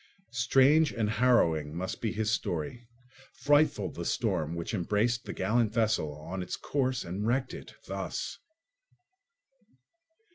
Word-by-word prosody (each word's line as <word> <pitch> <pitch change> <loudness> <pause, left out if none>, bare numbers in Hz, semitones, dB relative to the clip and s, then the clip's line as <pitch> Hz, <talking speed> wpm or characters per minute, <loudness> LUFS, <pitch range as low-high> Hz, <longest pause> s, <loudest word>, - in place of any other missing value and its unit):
Strange 135 +5 +4
and 110 -2 -1
harrowing 85 -11 +2
must 90 +2 -4
be 110 - 0
his 110 -1 -1
story, 100 +4 -3 0.5
frightful 145 +2 +2
the - - -6
storm 80 +2 -1
which 85 +4 -4
embraced 105 +5 0
the - - -5
gallant 110 +3 +1
vessel 110 -10 0
on 90 +5 -5
its 90 - -4
course 130 -3 -1
and 95 +5 -3
wrecked 130 +2 0
it—thus! - - -6
110 Hz, 120 wpm, -29 LUFS, 90-125 Hz, 0.5 s, Strange